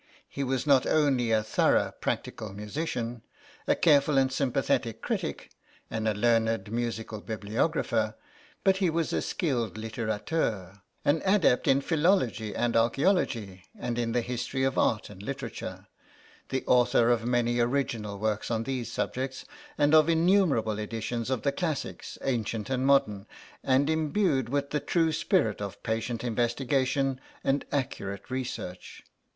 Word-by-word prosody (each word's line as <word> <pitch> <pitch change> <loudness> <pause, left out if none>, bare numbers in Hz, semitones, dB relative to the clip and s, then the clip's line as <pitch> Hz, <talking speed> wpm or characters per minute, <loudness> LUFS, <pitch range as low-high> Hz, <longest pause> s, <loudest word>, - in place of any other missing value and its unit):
He 140 - -4
was 130 0 -1
not 140 -3 +4
only 135 -6 +2
a 110 -1 +3
thorough 110 - +2
practical 105 -3 -3
musician, 120 +1 -4 0.5
a 290 - +4
careful 150 - +4
and 135 -1 +3
sympathetic 130 -4 0
critic, - - -3 0.4
and 110 0 -2
a 110 - +1
learned 115 -2 +1
musical 115 -2 -3
bibliographer, 110 +1 -1 0.5
but 190 -1 +4
he 190 -3 +2
was 165 0 -1
a - - +1
skilled 125 - -1
littérateur; 110 - -2 0.2
an 150 +2 +3
adept 190 -10 +3
in 135 +1 +4
philology 150 - +1
and 120 -1 0
archaeology 115 - +1
and 120 0 -3
in 115 -1 0
the 120 +1 +1
history 125 +2 -3
of 135 0 +1
art 110 -2 +1
and 95 -2 -11
literature; 135 -1 -6 0.6
the 130 -1 -1
author 120 -1 +4
of 115 -2 +1
many 120 0 +1
original 120 -5 -1
works 110 +1 -1
on 115 -1 0
these 125 -3 -3
subjects, 130 +2 -3 0.3
and 145 +1 +3
of 155 0 +6
innumerable 165 - +3
editions 115 +2 -3
of 130 -4 -1
the 140 - +2
classics, 160 0 -4
ancient 115 -2 -2
and 130 0 +1
modern; 105 -8 +2 0.4
and 135 +2 +3
imbued 155 - +1
with 140 +1 -1
the 150 - +1
true 165 0 +1
spirit 110 -8 +1
of 100 -2 -6
patient 115 +1 -2
investigation 130 +3 0 0.2
and 135 +1 +1
accurate 110 -6 -3
research. 125 -8 -5
120 Hz, 140 wpm, -28 LUFS, 110-140 Hz, 0.6 s, of